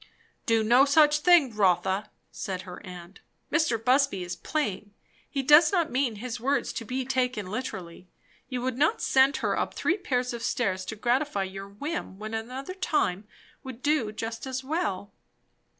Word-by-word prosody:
"Do 225 -1 +3
no 240 +5 +6
such 295 +1 +5
thing, 300 -8 +5
Rotha," 190 0 +1 0.2
said 185 -2 -5
her 180 +1 -10
aunt. 180 0 -11 0.3
"Mr. 310 -7 +2
Busby 250 -3 +2
is 180 +1 -5
playing; 205 -9 -3 0.3
he 275 -2 -2
does 300 +4 +7
not 345 -5 +1
mean 255 -3 0
his 235 +3 -5
words 275 +5 0
to 230 - -5
be 255 +3 -3
taken 250 -5 -1
literally. 185 -5 -6 0.4
You 250 -2 -3
would 255 0 -2
not 315 +10 +3
send 270 +1 +3
her - - +1
up - - -2
three 360 - +1
pair 250 -10 0
of 245 -2 -5
stairs 190 -5 -1
to 220 - -5
gratify 240 -1 0
your 195 +1 -7
whim, 250 - -5
when 215 +2 -7
another 255 +9 -5
time 220 - -1 0.4
would 260 -2 -9
do 290 -8 +1
just 225 +3 -5
as 260 0 -4
well?" 260 - -2
245 Hz, 165 wpm, -27 LUFS, 205-280 Hz, 0.4 s, does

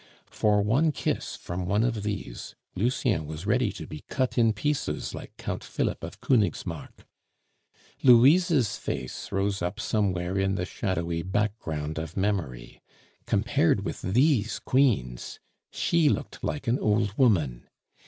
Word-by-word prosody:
For 105 -1 +2
one 135 +10 +3
kiss - - -2
from 90 +1 -5
one 105 +3 +2
of 115 -3 0
these, 100 - -5 0.2
Lucien 110 - 0
was 80 +4 -7
ready 125 0 +2
to 80 - -7
be 75 0 -9
cut 130 -2 -1
in 115 -2 +4
pieces 105 - -2
like - - -9
Count - - -4
Philip - - -2
of - - -7
Konigsmark. 105 - -1 1.0
Louise's 135 - +5
face 65 -1 -5
rose 100 0 0
up 90 +5 -3
somewhere 95 -4 0
in 95 0 +1
the 90 - -1
shadowy 85 -5 -2
background 80 -6 -2
of 80 +2 -6
memory 90 -12 -2 0.5
compared - - +2
with - - -4
these 120 - +2
queens, 105 - 0 0.3
she 170 -3 +2
looked - - -3
like 145 - -3
an 120 +3 +2
old 105 -1 +1
woman. 85 - +2
105 Hz, 135 wpm, -27 LUFS, 85-120 Hz, 1.0 s, Louise's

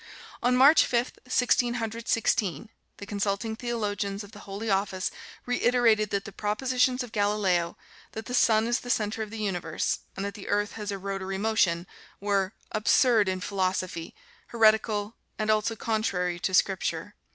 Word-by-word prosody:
On 250 +1 +3
March 285 +5 +7
Fifth, 240 +1 -1
Sixteen 245 -1 +2
Hundred 230 0 -4
Sixteen, 215 -2 0 0.3
the 200 - -8
consulting 205 +2 -2
theologians 210 -4 -3
of 205 - -13
the 205 - -12
Holy 200 +3 -5
Office 195 -2 0 0.3
reiterated 240 -4 +3
that 200 -1 -2
the 215 - -7
propositions 250 +5 0
of 245 - -9
Galileo, 205 -5 +1 0.4
that 220 - -6
the 250 - -6
sun 220 -3 +4
is 240 +1 +1
the 245 - -9
center 215 -2 0
of 215 - -4
the 225 - -7
universe, 180 -6 -1 0.2
and 195 - -3
that 200 - -4
the 205 - -10
earth 205 0 0
has 210 -2 -5
a 200 - -3
rotary 195 0 -4
motion, 190 -5 +1 0.3
were 200 -1 0 0.2
"absurd 215 -1 +3
in 185 0 -2
philosophy, 185 -3 -2 0.3
heretical, 220 -2 +2 0.2
and 215 0 +1
also 215 +1 +1
contrary 185 -6 -1
to 190 - -1
Scripture." 190 +1 0
210 Hz, 160 wpm, -27 LUFS, 195-230 Hz, 0.4 s, March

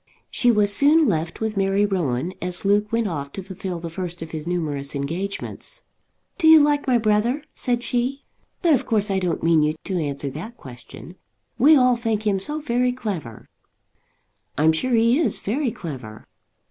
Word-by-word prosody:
She 245 - +2
was 205 -3 +4
soon 305 +5 +5
left 165 -1 -2
with 220 -1 -2
Mary 195 +1 +2
Rowan, 175 -5 -1
as 180 +1 -4
Luke 205 +1 +2
went 230 -1 +1
off 140 -6 -5
to 195 - -6
fulfil 185 -2 -6
the 165 0 -7
first 175 -1 -5
of 160 - -10
his 155 0 -6
numerous 150 -5 -2
engagements. 165 +8 -5 0.6
"Do 320 - +3
you 320 0 +9
like 290 -1 +2
my 250 -2 +4
brother?" 225 +6 +1
said 245 -1 -1
she. 255 +4 -2 0.4
"But 335 -3 +5
of 260 - 0
course 210 -2 +1
I 190 - +1
don't 180 -2 -2
mean 165 -1 +4
you 150 +1 +1
to 185 -2 -2
answer 140 -2 -3
that 215 - -8
question. 130 +7 -12 0.4
We 295 +6 +7
all 250 -1 +4
think 225 -2 -2
him 200 -2 +1
so 300 +10 -1
very 250 -3 0
clever." 195 - -6 1.1
"I'm 155 +2 +4
sure 245 +11 -1
he 230 +5 +3
is 265 -11 +1
very 255 +6 -1
clever." 130 - -8
200 Hz, 180 wpm, -22 LUFS, 165-240 Hz, 1.1 s, you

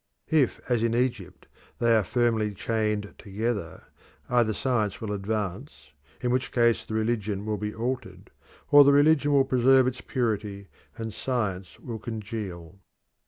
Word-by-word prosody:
If, 150 -5 +2
as 120 -3 +1
in 115 0 +1
Egypt, 105 -8 -2 0.3
they 115 -1 +3
are 110 - +3
firmly 110 -1 0
chained 105 -1 -1
together, 100 -4 -4 0.5
either 120 -3 +3
science 110 -4 -1
will 110 -2 -4
advance, 100 - -4 0.3
in 125 - 0
which 130 +1 0
case 120 -2 +2
the 110 - -6
religion 110 -3 -1
will 105 -1 -1
be 105 +1 -4
altered, 115 -6 -5 0.4
or 145 0 +10
the 140 0 +5
religion 145 0 +4
will 140 -2 +4
preserve 130 0 +4
its 130 0 -2
purity, 105 -5 -3 0.3
and 110 -2 -5
science 100 -9 -3
will 115 -3 -6
congeal. 100 -6 -6
110 Hz, 145 wpm, -26 LUFS, 105-125 Hz, 0.5 s, or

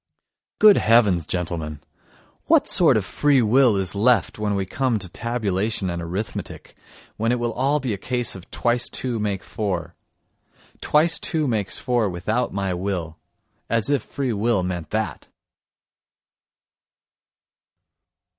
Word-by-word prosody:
Good 210 -1 +7
heavens, 105 -7 +3
gentlemen, 80 -4 -3 0.7
what - - +4
sort - - +5
of - - -2
free 145 -4 +2
will 120 -1 +4
is 95 -1 -1
left 115 +2 +2
when 105 -1 -1
we 95 -1 -1
come 130 +3 -1
to 95 - 0
tabulation 105 -2 -2
and 85 0 -4
arithmetic, 90 +6 -6 0.4
when 115 +2 0
it 125 - +1
will 120 -1 -2
all 140 +5 +1
be 130 -5 -2
a 100 - -5
case 120 +2 -2
of 95 -1 -11
twice 120 0 0
two 125 -3 -3
make 100 -3 -2
four? 100 -6 -4 0.9
Twice 160 +3 +2
two 155 -3 -1
makes 105 -6 -1
four 120 -4 0
without 110 +8 -2
my 95 -2 -2
will. 90 -3 -4 0.5
As 115 +4 +1
if 140 -4 +2
free 135 -1 -3
will 105 -2 +1
meant 90 -4 -4
that! 105 -8 -3
110 Hz, 135 wpm, -22 LUFS, 95-125 Hz, 0.9 s, Good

